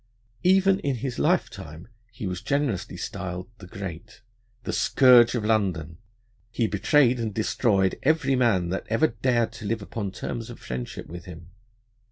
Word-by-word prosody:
Even 190 +1 +4
in 140 -7 -1
his 125 +1 -4
lifetime 80 +4 -1 0.2
he 110 -1 -7
was 90 -1 -3
generously 140 -9 -1
styled 90 +2 -5
the 90 - -11
Great. 100 +3 -8 0.4
The - - -4
scourge 125 -3 +5
of 110 -3 -2
London, 90 -8 0 0.5
he 115 0 0
betrayed 120 +5 +3
and 115 -2 -2
destroyed 100 -2 +1
every 155 -2 +2
man 105 -9 +2
that 95 - -3
ever 115 +8 +3
dared 120 0 0
to 115 -1 -10
live 110 0 -2
upon 100 -1 -4
terms 115 +4 -5
of - - -9
friendship 60 -1 -6
with 85 +2 -9
him. 85 -1 -11
110 Hz, 155 wpm, -25 LUFS, 90-125 Hz, 0.5 s, scourge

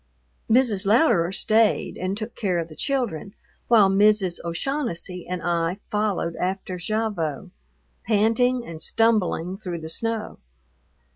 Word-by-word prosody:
Mrs. 225 -5 +3
Louderer 210 - +3
stayed 215 +3 +2
and 185 +2 -3
took 225 +2 -5
care 190 -5 -1
of 165 -1 -3
the 155 - -12
children 230 - -2 0.3
while 220 -4 +6
Mrs. 195 -2 +3
O'Shaughnessy 180 - -3
and 180 -1 -4
I 170 +1 0
followed 210 -5 -1
after 185 0 -3
Gavotte, 205 -8 -2 0.6
panting 230 +3 +2
and 160 -1 -8
stumbling, 195 -4 +1
through 180 -5 -6
the 160 0 -7
snow. 225 +3 -3
200 Hz, 125 wpm, -24 LUFS, 175-225 Hz, 0.6 s, while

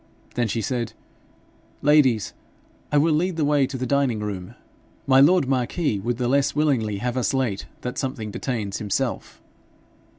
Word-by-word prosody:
Then 120 -1 0
she 110 +1 -2
said, 125 -2 -2 0.9
'Ladies, 140 -7 +4 0.6
I 150 - +3
will 155 +2 +4
lead 175 +3 0
the 155 -2 +1
way 145 -2 +3
to 135 - -5
the 130 - -2
dining 135 -4 +1
room. 100 -4 -5 0.5
My 130 -1 +5
lord 155 +1 +5
marquis 130 - 0
would 120 +4 -2
the 125 -1 -1
less 140 +2 +2
willingly 130 -9 +1
have 125 +4 -2
us 130 +1 0
late 120 -7 -1
that 125 - -4
something 130 -6 -3
detains 105 -5 -3
himself.' 105 -2 -3
130 Hz, 160 wpm, -23 LUFS, 110-140 Hz, 0.9 s, My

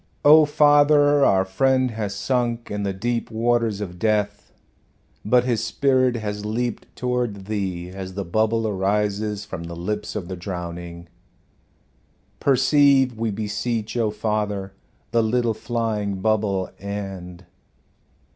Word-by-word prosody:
"Oh, 155 +1 +8
Father, 145 -1 +5
our 95 -5 +4
friend 130 +6 +2
has 105 -3 -4
sunk 120 +1 -1
in 105 0 -2
the 100 -1 -1
deep 115 +5 -2
waters 115 -2 0
of 90 -3 -6
death, 105 -1 -1 0.7
but 125 +3 +3
his 120 -3 0
spirit 130 -3 +2
has 105 -2 -4
leaped 115 +2 -3
toward 120 -6 -2
Thee 95 -4 -3
as 95 -1 -7
the 100 -1 -3
bubble 110 +5 +1
arises 105 +1 -1
from 85 -2 -7
the 85 0 -7
lips 105 +5 -4
of 95 -5 -4
the 95 - -5
drowning. 85 -1 -7 1.3
Perceive, 135 -1 +4
we 115 0 0
beseech, 110 +2 -3
O 115 -3 +1
Father, 105 -2 -2 0.4
the 115 0 +3
little 115 +1 +1
flying 110 -3 -2
bubble, 100 -1 0
and 95 -3 -6
105 Hz, 130 wpm, -23 LUFS, 100-120 Hz, 1.3 s, Oh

